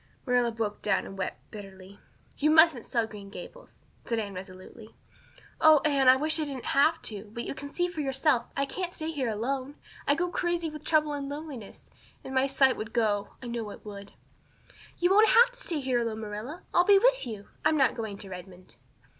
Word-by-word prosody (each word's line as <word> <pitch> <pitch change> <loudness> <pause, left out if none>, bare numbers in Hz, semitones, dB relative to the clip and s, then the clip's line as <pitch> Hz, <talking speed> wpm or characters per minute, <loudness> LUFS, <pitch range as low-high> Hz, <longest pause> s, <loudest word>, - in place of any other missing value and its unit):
Marilla 245 -2 +2
broke 220 -2 -3
down 195 -2 +1
and 195 - -9
wept 190 -1 -6
bitterly. 195 -2 -11 0.4
"You 300 - +1
mustn't 315 -6 +5
sell 230 -2 0
Green 205 -2 -10
Gables," - - -12 0.2
said 230 - 0
Anne 205 -3 -3
resolutely. 185 +4 -11 0.6
"Oh, 315 -1 +7
Anne, 275 -3 +4
I 255 - +8
wish 310 +4 +1
I - - +1
didn't 275 -4 -6
have 315 +4 +4
to. 210 -1 -4
But 235 +2 -5
you - - -4
can 285 +1 -8
see 355 +3 0
for 350 -4 -5
yourself. 270 -1 +1
I 275 - +2
can't 355 +5 -4
stay 320 -1 -4
here 270 -6 -2
alone. 260 +6 -3 0.3
I'd 285 - +3
go 355 +1 0
crazy 345 -2 -1
with 305 -1 -9
trouble 305 -2 +2
and 280 -1 -4
loneliness. 285 -7 -8 0.3
And 265 - -7
my 265 +1 +3
sight 270 -1 +3
would 220 +1 -6
go 210 -4 0
I - - -7
know 235 -3 -4
it - - -11
would." 200 -1 -9 0.8
"You 355 +1 +2
won't 430 +3 +6
have 485 +1 +6
to - - -7
stay 340 -10 -1
here 260 -3 0
alone, 225 -2 -3
Marilla. 220 - -6
I'll 350 - +5
be 400 +2 +6
with - - +3
you. 210 -3 -8
I'm 310 0 +3
not 270 -2 +3
going 220 -4 -5
to 200 - -9
Redmond." 180 0 -10
265 Hz, 205 wpm, -28 LUFS, 215-310 Hz, 0.8 s, I